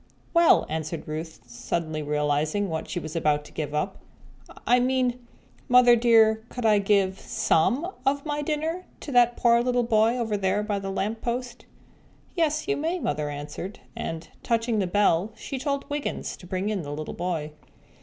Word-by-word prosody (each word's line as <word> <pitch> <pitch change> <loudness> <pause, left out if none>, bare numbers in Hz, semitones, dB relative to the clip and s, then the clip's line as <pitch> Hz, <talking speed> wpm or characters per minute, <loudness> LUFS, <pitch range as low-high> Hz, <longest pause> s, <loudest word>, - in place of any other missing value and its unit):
"Well," 335 -1 +5
answered 160 +1 -4
Ruth, 155 -4 -6
suddenly 155 +6 -3
realizing 150 +6 0
what 160 -1 -4
she 175 - -2
was 155 0 -7
about 150 -2 +1
to - - -13
give 150 -2 -4
up. 150 +6 -2 0.7
"I 245 +1 +5
mean, 250 -1 +1 0.5
Mother 245 -1 +7
dear, 225 -2 +5
could 245 -2 -5
I 210 -2 +5
give 195 -1 +2
some 255 - +1 0.2
of 280 +2 0
my 295 -1 -2
dinner 320 +4 -2 0.2
to 290 - -6
that 240 -1 +4
poor 235 -1 +4
little 245 0 +1
boy 225 +1 +3
over 225 -4 -1
there 195 +1 0
by 205 -1 -1
the 195 0 -5
lamp 210 +3 -2
post?" 245 0 -4 0.7
"Yes, 310 -2 0
you 420 - +1
may," 325 +5 -1
Mother 150 - -2
answered, 150 +7 -6 0.2
and, 165 0 -5
touching 230 -1 0
the 190 - 0
bell, 200 +1 +2
she 270 - -6
told 280 +1 -2
Wiggins 290 -1 -3
to 180 - -13
bring 190 +2 -2
in 210 -3 -1
the 145 -2 -6
little 155 +1 -5
boy. 170 -4 -3
210 Hz, 175 wpm, -26 LUFS, 160-250 Hz, 0.7 s, Mother